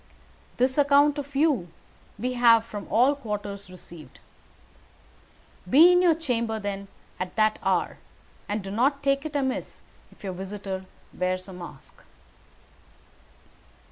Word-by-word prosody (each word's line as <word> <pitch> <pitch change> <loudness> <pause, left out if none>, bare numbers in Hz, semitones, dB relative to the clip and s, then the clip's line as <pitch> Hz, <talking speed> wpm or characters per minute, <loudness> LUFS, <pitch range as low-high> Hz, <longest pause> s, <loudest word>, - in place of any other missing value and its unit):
This 260 +3 +1
account 285 +1 +4
of 285 0 -8
you 275 - +2 0.5
we 250 +4 -2
have 230 -2 +5
from 205 -3 -7
all 250 +6 +4
quarters 205 -6 -6
received. 170 -6 -13 1.5
Be 320 - +8
in 360 0 +5
your 345 -3 +4
chamber, 235 -8 -2
then, 200 -1 -5 0.3
at 185 0 -5
that 215 -1 +2
hour, - - 0 0.5
and 205 0 -2
do 195 - -6
not 275 +6 +1
take 275 +2 +1
it 300 - -11
amiss 265 -2 -3 0.3
if - - -21
your 190 -2 -4
visitor 190 0 -6 0.3
wears 185 +1 -2
a 190 - -9
mask." 175 -6 -11
225 Hz, 130 wpm, -26 LUFS, 195-280 Hz, 1.5 s, Be